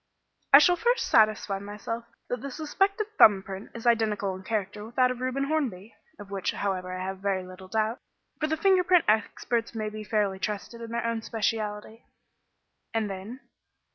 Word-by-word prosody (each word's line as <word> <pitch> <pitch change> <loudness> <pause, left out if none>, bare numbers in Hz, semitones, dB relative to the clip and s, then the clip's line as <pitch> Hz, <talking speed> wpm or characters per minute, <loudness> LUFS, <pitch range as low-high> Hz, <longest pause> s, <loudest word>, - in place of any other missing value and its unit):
"I 275 - +12
shall 355 +4 +5
first 480 +4 +1
satisfy 215 -2 +3
myself 210 +3 -6 0.2
that 245 -2 -3
the 280 - -5
suspected 390 - 0
thumb 200 -3 +7
print 195 +1 -8
is 230 - -8
identical 215 -4 +2
in 185 - -8
character 210 0 -3
with 230 +2 -11
that 255 -1 +4
of 250 0 -6
Reuben 255 +2 -1
Hornby 255 -10 -2 0.2
of 205 -1 -11
which, 195 -2 -1
however, 185 -2 -2
I 185 0 -4
have 190 0 -4
very 195 -1 -1
little 185 +1 -11
doubt, 220 +3 -1 0.4
for 310 - 0
the 315 +1 -1
finger 375 +2 +4
print 360 -1 +4
experts 230 +2 0
may 215 -1 -4
fairly 205 -2 0
be - - -31
trusted 215 +3 -4
in 230 - -7
their 235 0 -2
own 230 -1 -1
speciality." 220 0 -3 0.9
"And 215 -3 0
then?" 205 +8 -7
220 Hz, 180 wpm, -27 LUFS, 200-250 Hz, 0.9 s, I